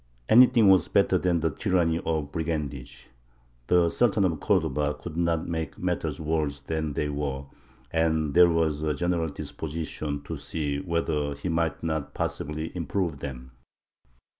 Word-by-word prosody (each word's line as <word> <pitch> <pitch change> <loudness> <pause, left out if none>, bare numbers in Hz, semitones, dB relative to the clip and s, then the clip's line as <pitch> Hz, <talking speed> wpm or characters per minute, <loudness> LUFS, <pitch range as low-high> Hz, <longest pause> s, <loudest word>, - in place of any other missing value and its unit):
Anything 120 -2 +7
was 95 -4 +5
better - - +3
than 85 -2 +1
the 80 -1 +1
tyranny 85 -2 +1
of 75 -3 -1
brigandage. 75 -6 -4 0.6
The 85 -2 +4
Sultan 110 -4 +2
of 80 -5 0
Cordova 75 +2 +1
could 85 -3 -8
not 85 -1 0
make 80 -2 -3
matters 85 -4 -2
worse 75 -2 -1
than 80 0 -3
they 75 - -1
were, 70 -2 -3 0.5
and 80 -2 +1
there 90 0 +7
was 80 -3 +1
a 75 -1 0
general 85 0 0
disposition 75 -1 -5
to - - -5
see 75 -3 -3
whether 75 -3 -1
he 75 +6 -4
might 80 -2 -1
not 80 -4 -3
possibly 80 +3 -3
improve 85 -2 -2
them. 65 -2 -7
80 Hz, 145 wpm, -27 LUFS, 75-85 Hz, 0.6 s, Anything